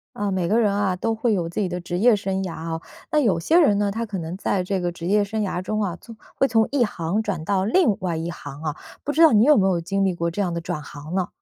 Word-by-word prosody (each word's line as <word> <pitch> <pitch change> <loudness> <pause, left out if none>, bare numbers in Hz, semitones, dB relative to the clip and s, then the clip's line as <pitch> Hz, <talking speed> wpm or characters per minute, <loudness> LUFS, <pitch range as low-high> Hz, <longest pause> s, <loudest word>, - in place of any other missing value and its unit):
呃， 205 -1 -2
每 185 -2 0
个 220 +6 +3
人 210 -3 +3
啊 200 -2 0
都 225 +5 -1
会 225 0 +1
有 175 -4 -1
自 170 - -4
己 200 - +1
的 180 0 -4
职 175 0 -4
业 225 +3 +5
生 195 -1 -2
涯 165 -3 -6
哦。 165 0 -3 0.3
那 305 - +3
有 200 - +2
些 320 - +3
人 245 -12 +4
呢， 205 -1 +1
他 230 +3 -3
可 205 -4 -5
能 165 +2 -5
在 195 -1 0
这 190 +1 -1
个 175 -1 -1
职 170 0 -7
业 205 +2 +3
生 215 +2 -3
涯 190 -3 -2
中 215 +3 -2
啊， 185 -4 -2
从 230 - -12 0.2
会 270 - +3
从 225 -3 +2
一 270 -4 +3
行 175 +1 -2
转 190 -7 -3
到 190 +1 0
另 230 - +3
外 180 -3 -2
一 165 +1 -3
行 145 -4 -8
啊， 155 -2 -3 0.3
不 290 - -1
知 315 - +1
道 320 - +8
你 215 +1 +6
有 300 +2 +6
没 195 - +3
有 180 -3 +1
经 195 +3 0
历 190 - +1
过 170 -1 -1
这 170 - -7
样 180 -3 -1
的 170 - -3
转 155 - -4
行 145 +4 -8
呢？ 185 -2 0
195 Hz, 320 characters per minute, -23 LUFS, 175-215 Hz, 0.3 s, 道